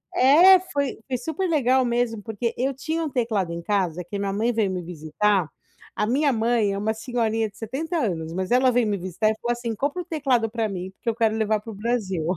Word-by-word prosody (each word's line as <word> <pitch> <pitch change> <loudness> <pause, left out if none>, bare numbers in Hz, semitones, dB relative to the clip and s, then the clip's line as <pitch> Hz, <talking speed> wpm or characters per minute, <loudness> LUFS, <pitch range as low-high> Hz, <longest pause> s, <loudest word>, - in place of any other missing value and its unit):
É, 340 +9 +7
foi 285 -7 -3
foi 260 -2 -1
super 320 +8 -3
legal 260 -4 +3
mesmo, 240 -2 -1
porque 225 +2 -3
eu 265 +3 0
tinha 320 +5 -3
um 315 - -2
teclado 225 -9 -1
em 170 0 -5
casa 180 -2 -1
que 190 +4 -6
minha 200 -1 -2
mãe 225 +4 +1
veio 220 -3 +1
me 180 -1 -3
visitar 175 +3 0 0.5
a - - 0
minha 280 +5 +2
mãe 225 -3 +1
é - - -3
uma 215 +2 0
senhorinha 225 -1 -1
de 200 - -22
70 295 - -3
anos, 165 - -2
mas 185 +4 -3
ela 255 +1 +5
veio 245 -1 +2
me 205 -1 0
visitar 185 +4 -1
e - - -4
falou 240 - -1
assim: 240 -1 -3
"Compra 290 - -2
o - - -28
teclado 265 -8 +1
pra 225 -1 -2
mim, 185 -1 -5
porque 210 +4 -4
eu 225 - -1
quero 225 -2 +1
levar 215 -1 +1
para 225 +2 -9
o - - -9
Brasil". 205 -5 -2
225 Hz, 235 wpm, -24 LUFS, 200-255 Hz, 0.5 s, É